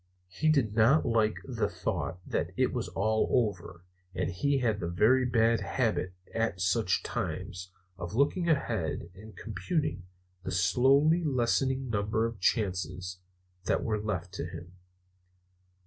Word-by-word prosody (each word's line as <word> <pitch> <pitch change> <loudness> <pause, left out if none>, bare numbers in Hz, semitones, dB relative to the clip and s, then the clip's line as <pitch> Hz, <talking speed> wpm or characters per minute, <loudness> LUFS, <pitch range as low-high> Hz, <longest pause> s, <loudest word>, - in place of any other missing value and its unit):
He 150 +12 0
did 135 -9 +2
not 115 +8 +4
like 110 -3 +2
the - - -1
thought - - -3
that - - -2
it - - +2
was - - -2
all 110 +3 +1
over; 95 -7 -1 0.3
and - - -1
he 140 +11 +1
had 115 -5 0
the 85 - -3
very 110 +9 +3
bad 115 -1 +3
habit, 110 -7 -1 0.2
at 115 -5 -1
such 90 +2 +1
times, 90 +1 -4 0.3
of 85 +4 -5
looking 165 +7 +2
ahead 95 - -1
and 105 +3 -13
computing 115 - -2 0.3
the - - -6
slowly 135 - +3
lessening 130 -1 +1
number 105 +2 0
of 115 -3 -4
chances 90 -3 -1 0.5
that - - +1
were 110 -2 -1
left 95 -4 -3
to 95 - -4
him. 85 +1 -10
110 Hz, 140 wpm, -30 LUFS, 90-125 Hz, 0.5 s, not